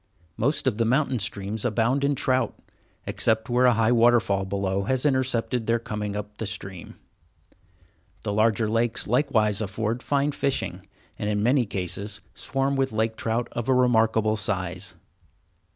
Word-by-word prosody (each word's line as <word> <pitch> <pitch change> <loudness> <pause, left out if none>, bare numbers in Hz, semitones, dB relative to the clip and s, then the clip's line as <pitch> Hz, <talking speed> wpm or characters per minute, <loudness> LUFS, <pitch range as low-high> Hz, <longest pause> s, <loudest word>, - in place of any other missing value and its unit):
Most 140 +7 +1
of 120 -4 0
the - - +4
mountain 130 +1 +1
streams 100 +1 -3
abound 120 +4 +1
in 140 0 +2
trout, 130 -3 0 0.5
except 110 +1 0
where 125 +1 +4
a 125 - +4
high 115 +1 +3
waterfall 115 -5 +3
below 95 0 -1
has 130 +4 0
intercepted 125 -4 0
their 115 0 +3
coming 105 -3 -4
up 105 0 -6
the 110 - -2
stream. 95 -3 -6 1.3
The 100 - -2
larger 110 +1 +2
lakes 115 +2 0
likewise 110 -4 +1
afford 110 +3 -2
fine 140 +2 +1
fishing, 140 -1 -2 0.3
and 105 - -1
in 105 0 0
many 125 0 +3
cases 100 +2 -3
swarm 135 +1 -1
with 135 -2 0
lake 110 +1 0
trout 115 +2 -1
of 120 +1 -4
a 130 - +4
remarkable 110 -3 +3
size. 95 -3 -3
115 Hz, 150 wpm, -25 LUFS, 105-125 Hz, 1.3 s, the